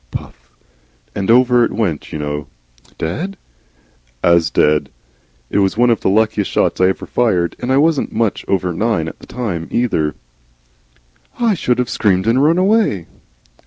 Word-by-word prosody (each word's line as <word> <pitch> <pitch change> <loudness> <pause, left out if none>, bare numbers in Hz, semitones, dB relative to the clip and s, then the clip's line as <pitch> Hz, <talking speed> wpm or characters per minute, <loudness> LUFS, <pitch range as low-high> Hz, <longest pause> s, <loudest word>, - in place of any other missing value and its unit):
(Puff.) - - -9 0.6
And 100 0 -3
over 125 0 +5
it - - 0
went, 90 -10 -2
you - - -4
know." 75 -1 -4 0.5
"Dead?" 175 - -4 0.9
"AS 85 -2 +4
dead. 75 -1 +2 0.6
It - - +1
was 95 +1 +1
one 120 0 +4
of 115 - +1
the - - +1
luckiest 105 0 +1
shots - - 0
I 95 - +5
ever 95 - -2
fired. 90 -9 0
And 125 - -3
I 135 - +3
wasn't 155 0 +2
much 110 -2 -1
over 90 -2 0
nine 105 -3 0
at - - -8
the - - -14
time, 100 -10 -4
neither." 80 - 0 1.2
"I 230 -3 +2
should 125 -9 0
have 125 -1 0
screamed 95 -4 +1
and 120 +5 +3
run 160 +3 +3
away." 190 - +2
110 Hz, 160 wpm, -17 LUFS, 85-125 Hz, 1.2 s, over